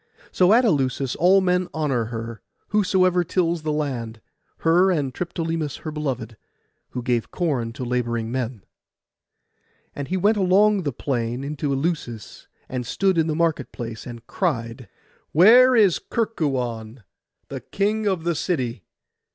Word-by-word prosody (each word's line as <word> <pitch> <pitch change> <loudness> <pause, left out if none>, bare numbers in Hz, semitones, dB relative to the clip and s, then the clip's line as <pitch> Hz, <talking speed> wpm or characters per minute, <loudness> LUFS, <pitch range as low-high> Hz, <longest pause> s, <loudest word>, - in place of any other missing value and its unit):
So 180 +1 +4
at 240 +3 +5
Eleusis 135 - 0
all 185 +4 +5
men 180 -1 +1
honour 135 -7 0
her, 115 0 -6 0.3
whosoever 185 -3 +2
tills 170 -1 0
the 155 0 -2
land; 125 -7 -3 0.5
her 175 +4 +5
and 145 -8 0
Triptolemus 165 -3 -3
her 155 - -4
beloved, 130 -7 -4 0.5
who 125 - -5
gave 120 -2 0
corn 135 -10 -1
to 130 0 -5
labouring 120 -2 -2
men. 120 -5 -3 1.3
And 140 -1 -5
he 185 - -1
went 210 +4 +3
along 200 +2 +4
the 145 -5 -2
plain 120 -1 -3
into 145 0 -3
Eleusis, 135 -6 -3 0.2
and 125 -1 -4
stood 190 +10 +1
in 160 - +2
the 155 - -1
market 160 -4 0
place, 115 -1 -7
and 120 -1 -9
cried— 120 - -3 0.4
'Where 245 +10 +7
is 205 -7 +4
Kerkuon, 125 - -3 0.5
the - - -5
king 210 +2 -1
of 185 -5 0
the 170 0 +1
city? 130 - -2
150 Hz, 145 wpm, -23 LUFS, 120-180 Hz, 1.3 s, Where